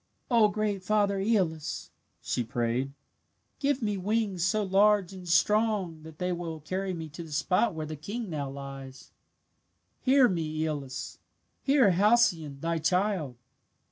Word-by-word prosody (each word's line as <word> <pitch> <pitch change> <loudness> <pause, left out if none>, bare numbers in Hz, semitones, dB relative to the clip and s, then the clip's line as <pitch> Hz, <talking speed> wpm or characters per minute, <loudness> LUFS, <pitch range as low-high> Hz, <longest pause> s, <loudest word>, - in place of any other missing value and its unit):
"O 230 -3 +6
great 210 -2 -2
father 200 0 +2
Aeolus," 185 -7 -1 0.3
she 120 - -1
prayed, 120 +3 -1 0.7
"give 280 -3 0
me 210 -2 0
wings 200 -2 0
so 210 +4 +2
large 195 -1 +3
and 180 -2 -9
strong 205 -3 +2
that 160 -1 -12
they 180 +2 -1
will 170 -2 -4
carry 185 +5 -3
me 165 -3 -5
to 150 - -9
the 165 -2 -9
spot 180 +7 +1
where 155 -1 -3
the 155 +1 -6
king 205 +10 -5
now 145 -5 -3
lies. 135 -1 -9 0.9
"Hear 265 -1 +5
me, 155 -5 -2
Aeolus! 145 -5 -4 0.4
Hear 270 -7 +4
Halcyone, 175 -8 +3
thy 165 0 -1
child!" 180 -4 0
180 Hz, 140 wpm, -28 LUFS, 155-210 Hz, 0.9 s, O